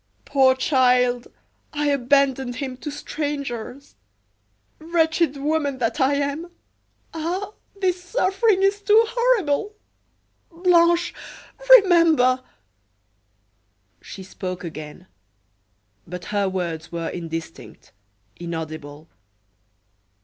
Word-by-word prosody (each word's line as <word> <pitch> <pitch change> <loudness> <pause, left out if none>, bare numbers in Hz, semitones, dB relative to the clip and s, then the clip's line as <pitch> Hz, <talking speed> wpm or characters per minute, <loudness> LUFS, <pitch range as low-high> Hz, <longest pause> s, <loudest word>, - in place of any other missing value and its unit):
Poor 265 -2 +4
child! 250 -2 +2 0.5
I 295 -1 0
abandoned 265 -1 +1
him 265 -2 -5
to 295 - -6
strangers. 280 -3 -5 0.8
Wretched 320 -2 +1
woman 290 -1 -1
that 235 +1 -1
I 270 +2 +3
am! 285 +4 -2 0.6
Ah! 355 +5 -3 0.3
this 365 -2 0
suffering 390 0 +1
is 400 +1 +2
too 420 +2 +5
horrible. 430 -6 0 0.8
Blanche, 345 0 +3 0.7
remember 320 -9 +4 0.8
" 100 0 -45
She 190 - -10
spoke 185 -1 -6
again, 155 +1 -8 1.0
but 180 0 -7
her 200 -2 +1
words 170 -4 -4
were 170 -1 -3
indistinct, 165 -1 -8 0.5
inaudible. 155 -3 -7
275 Hz, 90 wpm, -22 LUFS, -, 1.0 s, too